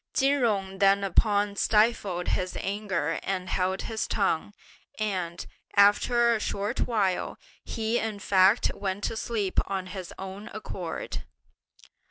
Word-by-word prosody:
Chin 280 +1 +3
Jung 195 -4 0
thereupon 200 +1 +3
stifled 210 -4 +2
his 185 -1 -1
anger 195 -6 -2
and 185 -1 -3
held 190 +1 0
his 220 -1 -3
tongue; 195 -3 0 0.5
and, 185 -5 -2 0.3
after 235 +4 +5
a 225 - 0
short 205 +3 -2
while, 200 -6 0 0.3
he 225 +1 -1
in 220 -2 -3
fact 195 +2 +4
went 195 0 -3
to - - -1
sleep 215 -4 -1
of 190 -2 -2
his 185 -2 -7
own 195 +3 -7
accord. 185 -5 -5
200 Hz, 125 wpm, -27 LUFS, 190-215 Hz, 0.5 s, after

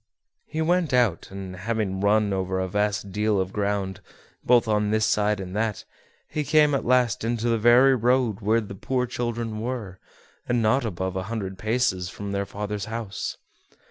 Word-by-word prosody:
He 160 +1 -2
went 170 -4 +1
out, 120 -9 +2
and, 95 -1 -7
having 100 -1 -2
run 105 0 +3
over 95 0 -1
a 95 - -1
vast 105 +1 -1
deal 105 +1 +1
of 95 0 -2
ground, 100 -2 -2 0.4
both 120 -1 +4
on 105 -1 +1
this 110 0 +2
side 105 0 +1
and 95 0 -6
that, 110 -2 -1 0.4
he 150 - -2
came 150 0 +4
at 140 - 0
last 125 -3 +2
into 115 0 -1
the 115 -1 +2
very 120 +4 +6
road 120 -3 +1
where 110 +2 +2
the 100 -2 -8
poor 125 +6 -1
children 120 -2 -3
were, 110 -5 -4 0.5
and 120 0 +2
not 115 +4 +2
above 95 -2 -3
a 95 - -2
hundred 95 -5 -4
paces 110 -5 0
from 100 0 -6
their 100 0 -2
father's 105 -1 -4
house. 115 -3 -5
110 Hz, 175 wpm, -25 LUFS, 100-120 Hz, 0.5 s, very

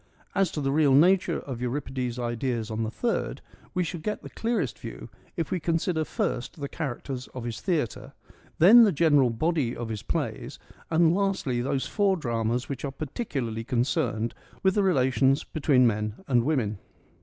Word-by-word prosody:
As 195 -3 +2
to 150 - -2
the 135 -1 0
real 145 -2 +4
nature 175 +2 +4
of 125 -4 -6
Euripides' 125 -1 -3
ideas 120 -1 -2
on 110 +1 -2
the 110 - -1
third, 235 - -2 0.4
we 180 - +2
shall 170 0 -4
get 210 +6 -3
the - - -9
clearest 230 +1 -2
view - - -8 0.3
if 165 -4 -2
we 185 - 0
consider 165 0 0
first 125 +1 -3
the 140 - -3
characters 135 -3 -5
of 125 - -5
his 115 -2 -5
theatre, 160 - -2 0.4
then 215 +9 +9
the 210 - +5
general 145 -5 +4
body 130 +1 0
of 120 -1 -5
his 110 -2 -4
plays, - - -3 0.3
and 165 0 +4
lastly, 190 -11 0
those 135 +1 -1
four 200 -3 +1
dramas 120 -3 -1
which 135 -3 -5
are 140 - -1
particularly 135 - -4
concerned 120 -2 0 0.3
with 190 0 +4
the 205 - +2
relations 135 -5 +3
between 140 -4 +2
men 105 -2 0
and 120 -3 +3
women. 115 -9 0
135 Hz, 170 wpm, -27 LUFS, 120-165 Hz, 0.4 s, then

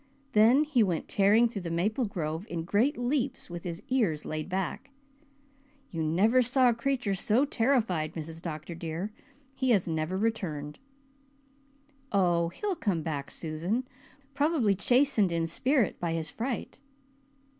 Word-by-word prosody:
Then 235 +6 +5
he 295 -6 +2
went 180 -6 0
tearing 210 +4 +4
through 225 -4 -5
the 170 - -5
maple 210 +9 0
grove 165 -1 -4
in 165 -1 -3
great 220 - +1
leaps 245 -5 -1
with 175 -1 -6
his 170 0 -6
ears 210 - +1
laid 155 +2 -4
back. 190 +8 -3 1.0
You 165 - -3
never 195 +11 +3
saw 255 +1 +4
a - - +3
creature 240 -3 -1
so 215 +8 +2
terrified, 225 - 0
Mrs. 165 0 -6
Dr. 160 -1 -6
dear. 170 +4 -4 0.4
He 260 - 0
has 205 -7 +3
never 160 +3 -1
returned." 175 -9 -2 1.3
"Oh, 175 -4 +2
he'll 400 - -3
come 195 - -1
back, 145 -3 -3
Susan, 175 +11 -3 0.5
probably 285 -7 +2
chastened 235 -1 +3
in 165 -1 0
spirit 245 - +1
by 170 -1 -1
his 160 -2 -2
fright." 240 +1 -4
195 Hz, 145 wpm, -29 LUFS, 165-245 Hz, 1.3 s, Then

